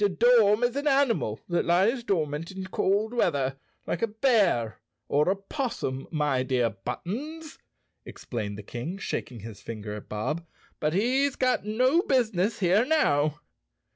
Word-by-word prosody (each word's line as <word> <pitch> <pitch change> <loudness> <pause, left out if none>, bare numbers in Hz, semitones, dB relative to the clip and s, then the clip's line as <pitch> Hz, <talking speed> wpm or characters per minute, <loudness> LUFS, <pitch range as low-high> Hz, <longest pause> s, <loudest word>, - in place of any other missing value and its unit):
"A 205 - +4
dorm 225 +1 +4
is 245 +1 +1
an 285 +1 -1
animal 270 - +2
that 175 -1 +1
lies 200 +9 +2
dormant 160 -6 -1
in 190 0 -6
cold 200 +4 0
weather, 135 - 0 0.3
like - - -3
a 230 - +2
bear 210 - +2 0.3
or 150 +4 +2
a 190 - +2
'possum, 195 - -4
my 150 -5 0
dear 125 -3 +1
Buttons," 250 - -6 0.4
explained 105 -4 -6
the 105 - -8
King, 120 - -5
shaking 125 - -4
his 110 -1 -9
finger 105 -2 -6
at 105 - -9
Bob, 150 +11 -2 0.4
"but 150 +1 0
he's 260 +7 +2
got 255 -4 +1
no 255 +10 +3
business 225 - +1
here 190 +4 +4
now." 150 - +2
190 Hz, 150 wpm, -27 LUFS, -, 0.4 s, A